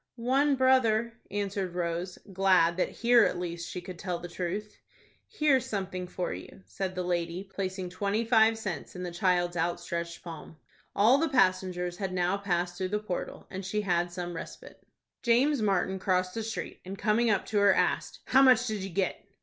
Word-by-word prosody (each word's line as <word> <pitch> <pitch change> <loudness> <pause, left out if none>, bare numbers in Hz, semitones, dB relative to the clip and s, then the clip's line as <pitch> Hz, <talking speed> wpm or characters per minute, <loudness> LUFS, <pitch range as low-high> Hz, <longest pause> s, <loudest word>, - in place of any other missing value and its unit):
"One 270 +4 +2
brother," 235 -3 +3 0.2
answered 195 -3 -3
Rose, 175 +1 -2 0.2
glad 185 -3 +4
that 185 - +1
here 240 -1 +4
at - - +1
least 170 -1 -4
she 180 - -5
could 175 -1 -9
tell 180 -2 -2
the 175 +1 -7
truth. 185 +4 -5 0.5
"Here's 285 - +2
something 190 -5 -3
for 180 0 -3
you," 190 - -10
said 190 -1 -4
the 180 - -2
lady, 175 0 -2
placing 190 -2 -4
twenty 205 +4 -1
five 225 -1 +4
cents 190 -7 -5
in 180 - -5
the 175 - -4
child's 175 0 +1
outstretched 170 0 -3
palm. 165 -2 -9 0.4
All 230 +7 +5
the 325 - +1
passengers 185 -7 +1
had 190 -1 -3
now 180 +1 +1
passed 175 -3 -1
through 185 -1 -1
the 210 - 0
portal, 210 -4 -5
and 190 +1 -5
she 210 +3 -1
had 175 -3 0
some 175 -1 -5
respite. - - -9 0.4
James 255 +3 +3
Martin 190 -2 +1
crossed 185 -1 0
the 225 - -3
street, 220 0 -5
and, 190 +2 -7
coming 230 +3 +2
up 200 -3 +1
to 210 - 0
her, 200 -1 +6
asked, - - 0
"How 265 - +5
much 255 -2 +6
did 215 -4 -2
you 195 - -4
get?" 185 +1 -1
190 Hz, 185 wpm, -29 LUFS, 175-220 Hz, 0.5 s, her